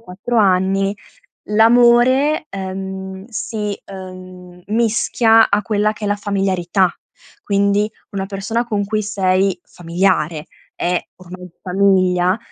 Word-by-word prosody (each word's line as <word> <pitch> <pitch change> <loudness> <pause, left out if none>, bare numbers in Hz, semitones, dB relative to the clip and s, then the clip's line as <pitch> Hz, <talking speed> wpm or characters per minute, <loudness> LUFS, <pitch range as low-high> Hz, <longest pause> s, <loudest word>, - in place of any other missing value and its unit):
4 230 +4 -5
anni, 195 0 +2 0.6
l'amore, 240 +7 +4
ehm, 190 0 -6
si, 215 -2 -4
ehm, 185 -1 -11
mischia 225 0 +3
a 200 +1 +2
quella 210 +1 0
che 210 -1 -7
è - - -1
la 205 - +1
familiarità, 195 -2 0 0.5
quindi 200 +1 +1 0.2
una 195 -1 -3
persona 210 +4 -2
con 210 -3 -1
cui 215 +1 -1
sei 190 -2 0
familiare 170 -3 -1 0.3
è 180 0 0 0.2
ormai 180 0 -11
famiglia, 185 0 +2
195 Hz, 110 wpm, -18 LUFS, 185-215 Hz, 0.6 s, l'amore